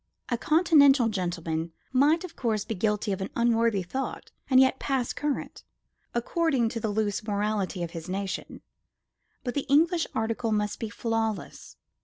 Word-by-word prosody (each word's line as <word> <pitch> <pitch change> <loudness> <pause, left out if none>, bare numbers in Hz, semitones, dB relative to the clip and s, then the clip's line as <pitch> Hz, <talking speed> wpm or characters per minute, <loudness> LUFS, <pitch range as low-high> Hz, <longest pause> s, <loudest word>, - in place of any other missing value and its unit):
A 240 - +1
continental 285 -7 +5
gentleman 170 -4 -3 0.2
might, 295 +6 +4
of 365 - -8
course, 220 -4 -1
be - - -3
guilty 210 +1 0
of 195 0 -2
an 190 - -3
unworthy 230 -4 +2
thought 265 +10 -5 0.2
and 260 -1 +6
yet 265 0 +4
pass 265 -4 -1
current, 295 -2 -3 0.5
according 260 -1 +1
to 230 - -4
the 220 - -2
loose 205 -1 0
morality 205 -3 -1
of 170 - -5
his 165 +1 -7
nation. 195 0 -4 0.8
But 245 - -3
the 285 - -2
English 325 +4 +3
article 225 +1 -1
must 210 -1 -1
be 225 - -3
flawless. 225 -2 -3
225 Hz, 155 wpm, -27 LUFS, 205-265 Hz, 0.8 s, and